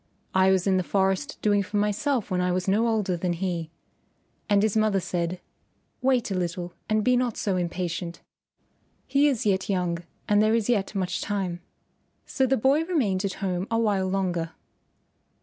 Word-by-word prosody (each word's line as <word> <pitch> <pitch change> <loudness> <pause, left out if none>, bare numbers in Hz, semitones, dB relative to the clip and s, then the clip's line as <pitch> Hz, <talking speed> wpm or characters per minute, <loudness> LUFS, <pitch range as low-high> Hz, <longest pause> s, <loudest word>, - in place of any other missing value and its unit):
I 190 0 +4
was 190 -2 +2
in 190 -1 +3
the 185 - +1
forest 190 -5 0
doing 205 -1 +3
for 205 +2 -3
myself 210 +3 0
when 180 -1 +1
I 180 0 +1
was 180 +1 -1
no 215 +4 +3
older 210 -5 +1
than 175 +1 -1
he." 170 -2 -3 0.8
And 205 0 +4
his 215 -1 +1
mother 215 -2 +3
said, 175 0 -2 0.6
"Wait 255 -5 +2
a - - +1
little 175 -1 -3 0.2
and 215 0 +2
be 250 +3 +4
not 245 -2 0
so 195 -3 0
impatient. 175 -1 -3 0.9
He 280 +2 +3
is 260 -7 0
yet 190 -2 +1
young 180 -3 0 0.3
and 205 0 +4
there 215 +1 +3
is 230 0 0
yet 210 -3 0
much 185 -3 -1
time." 190 -4 -2 0.6
So 265 - +1
the 265 +1 +2
boy 275 +7 +3
remained 225 - 0
at 195 - -2
home 185 +1 -1
a 230 - +1
while 205 -4 +1
longer. 180 -4 -1
195 Hz, 180 wpm, -26 LUFS, 180-215 Hz, 0.9 s, I